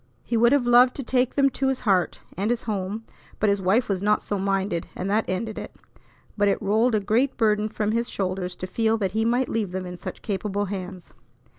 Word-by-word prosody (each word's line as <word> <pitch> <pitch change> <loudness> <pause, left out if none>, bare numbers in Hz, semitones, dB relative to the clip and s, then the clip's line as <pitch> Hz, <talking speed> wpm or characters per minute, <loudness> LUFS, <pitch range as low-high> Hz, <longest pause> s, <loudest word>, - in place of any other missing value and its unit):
He 235 - -2
would 235 +1 +5
have 280 -3 +3
loved 245 +1 +6
to 275 - -4
take 250 0 +1
them 275 -1 +4
to 270 +2 -1
his 265 -1 0
heart 195 -6 +1
and 200 +4 -1
his 240 -1 0
home; 205 0 -3 0.4
but 210 -1 +3
his 200 -1 0
wife 195 +7 +2
was 190 -2 -1
not 210 +1 +2
so 205 - -2
minded, 195 -3 -1
and 190 +2 -3
that 220 +2 +2
ended 215 +4 -3
it. - - -9 0.6
But 205 -1 +2
it 200 - +2
rolled 220 +4 +2
a - - +3
great 230 +7 +1
burden 215 -2 +2
from 210 -1 -1
his 235 +1 -1
shoulders 185 -2 -3
to 185 - -5
feel 225 +3 +1
that 195 -4 -1
he 220 +2 0
might 245 +3 +2
leave 210 -5 -2
them 185 0 -3
in 180 0 -7
such - - -8
capable 205 0 -2
hands. 185 -2 -7
210 Hz, 230 wpm, -24 LUFS, 195-230 Hz, 0.6 s, loved